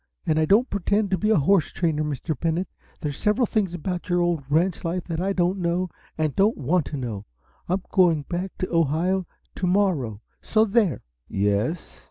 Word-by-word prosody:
And 160 Hz, -2 st, +2 dB
I 160 Hz, -, +3 dB
don't 215 Hz, +10 st, +4 dB
pretend 200 Hz, 0 st, 0 dB
to 190 Hz, -, +2 dB
be 215 Hz, -, +1 dB
a 220 Hz, -, +5 dB
horse 165 Hz, +3 st, +3 dB
trainer, 160 Hz, -3 st, 0 dB
Mr. 150 Hz, +2 st, -3 dB
Bennett. 165 Hz, +6 st, -1 dB, 0.3 s
There's 145 Hz, -3 st, -4 dB
several 210 Hz, +4 st, +2 dB
things 200 Hz, -6 st, -1 dB
about 175 Hz, +2 st, -4 dB
your 175 Hz, 0 st, +2 dB
old 175 Hz, -4 st, +1 dB
ranch 170 Hz, +5 st, +1 dB
life 175 Hz, +1 st, -2 dB
that 165 Hz, -1 st, -3 dB
I 195 Hz, +2 st, 0 dB
don't 185 Hz, 0 st, +1 dB
know 175 Hz, 0 st, -1 dB, 0.3 s
and 155 Hz, -3 st, 0 dB
don't 205 Hz, +3 st, +3 dB
want 155 Hz, +3 st, +1 dB
to 150 Hz, -, -4 dB
know! 115 Hz, -6 st, -5 dB, 0.4 s
I'm 185 Hz, +1 st, 0 dB
going 170 Hz, -5 st, +4 dB
back 180 Hz, +4 st, -4 dB
to 185 Hz, -, -3 dB
Ohio 165 Hz, +4 st, +1 dB, 0.3 s
to 185 Hz, -, -2 dB
morrow, 175 Hz, -, +1 dB, 0.2 s
so 220 Hz, 0 st, +3 dB
there!" 205 Hz, -, +1 dB, 0.2 s
"Yes?" 105 Hz, -, -1 dB
175 Hz, 190 wpm, -24 LUFS, 155-190 Hz, 0.4 s, a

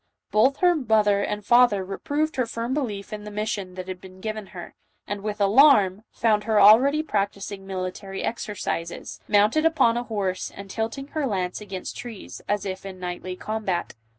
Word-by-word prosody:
Both 260 Hz, +7 st, +4 dB
her 355 Hz, -1 st, +6 dB
mother 215 Hz, -7 st, +3 dB
and 210 Hz, 0 st, -3 dB
father 240 Hz, -5 st, +5 dB
reproved 300 Hz, +10 st, -2 dB
her 255 Hz, -2 st, +1 dB
firm 230 Hz, +2 st, -3 dB
belief 215 Hz, -9 st, -3 dB
in 210 Hz, -1 st, -6 dB
the 210 Hz, -, -7 dB
mission 205 Hz, -3 st, -3 dB
that 185 Hz, 0 st, -6 dB
had 185 Hz, -1 st, -6 dB
been 185 Hz, 0 st, -13 dB
given 215 Hz, 0 st, -5 dB
her, 175 Hz, -2 st, -9 dB, 0.3 s
and, 205 Hz, -1 st, -4 dB
with 210 Hz, 0 st, -4 dB
alarm, 205 Hz, -2 st, +5 dB
found 215 Hz, -2 st, +1 dB
her 220 Hz, -2 st, +3 dB
already 255 Hz, +9 st, +6 dB
practising 200 Hz, -5 st, -3 dB
military 190 Hz, +1 st, -5 dB
exercises, 190 Hz, -6 st, -4 dB
mounted 210 Hz, +9 st, +4 dB
upon 315 Hz, -8 st, +3 dB
a 240 Hz, -, -1 dB
horse 195 Hz, -5 st, -2 dB
and 200 Hz, 0 st, -9 dB
tilting 230 Hz, +6 st, -3 dB
her 300 Hz, -3 st, -1 dB
lance 185 Hz, -3 st, -2 dB
against 190 Hz, -3 st, -6 dB
trees, 230 Hz, -5 st, -8 dB
as 205 Hz, 0 st, 0 dB
if 190 Hz, -1 st, -4 dB
in 190 Hz, -1 st, -8 dB
knightly 180 Hz, 0 st, -5 dB
combat. 210 Hz, -3 st, -3 dB
210 Hz, 175 wpm, -25 LUFS, 195-230 Hz, 0.3 s, her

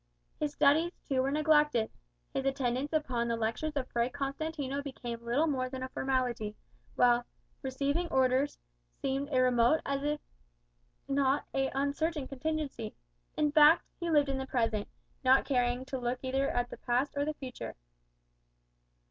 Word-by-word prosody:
His 300 Hz, -1 st, 0 dB
studies, 305 Hz, +5 st, +3 dB
too, 265 Hz, -3 st, +2 dB
were 265 Hz, -, +1 dB
neglected; 295 Hz, -5 st, +3 dB, 0.4 s
his 270 Hz, -, -1 dB
attendance 270 Hz, +1 st, 0 dB
upon 255 Hz, -7 st, 0 dB
the 230 Hz, -, 0 dB
lectures 230 Hz, +7 st, -2 dB
of 265 Hz, -3 st, -1 dB
Fray 235 Hz, +1 st, +1 dB
Constantino 280 Hz, +1 st, -3 dB
became 240 Hz, -4 st, -6 dB
little 245 Hz, +7 st, +2 dB
more 260 Hz, -5 st, 0 dB
than 260 Hz, 0 st, -5 dB
a 260 Hz, -, -4 dB
formality; 250 Hz, -6 st, -1 dB, 0.4 s
while 245 Hz, 0 st, +4 dB, 0.4 s
"receiving 280 Hz, +6 st, -1 dB
Orders" 265 Hz, 0 st, +2 dB, 0.4 s
seemed 275 Hz, +2 st, -1 dB
a 260 Hz, -, +3 dB
remote 250 Hz, +3 st, +4 dB
if 290 Hz, +2 st, -1 dB, 0.9 s
not 275 Hz, 0 st, +2 dB
an 270 Hz, 0 st, +1 dB
uncertain 285 Hz, +1 st, -1 dB
contingency. 275 Hz, -4 st, -3 dB, 0.4 s
In 300 Hz, -1 st, +2 dB
fact, 305 Hz, +2 st, +7 dB, 0.2 s
he 345 Hz, -1 st, -2 dB
lived 295 Hz, -3 st, +4 dB
in 270 Hz, -1 st, -1 dB
the 265 Hz, -, -4 dB
present, 225 Hz, -5 st, 0 dB, 0.4 s
not 260 Hz, +1 st, +5 dB
caring 245 Hz, -1 st, +1 dB
to 265 Hz, -1 st, -4 dB
look 245 Hz, +1 st, -1 dB
either 270 Hz, +1 st, 0 dB
at 245 Hz, 0 st, -1 dB
the -, -, -7 dB
past 250 Hz, +4 st, 0 dB
or 285 Hz, -, +1 dB
the 305 Hz, +1 st, -2 dB
future. 260 Hz, -3 st, -7 dB
270 Hz, 150 wpm, -31 LUFS, 250-290 Hz, 0.9 s, fact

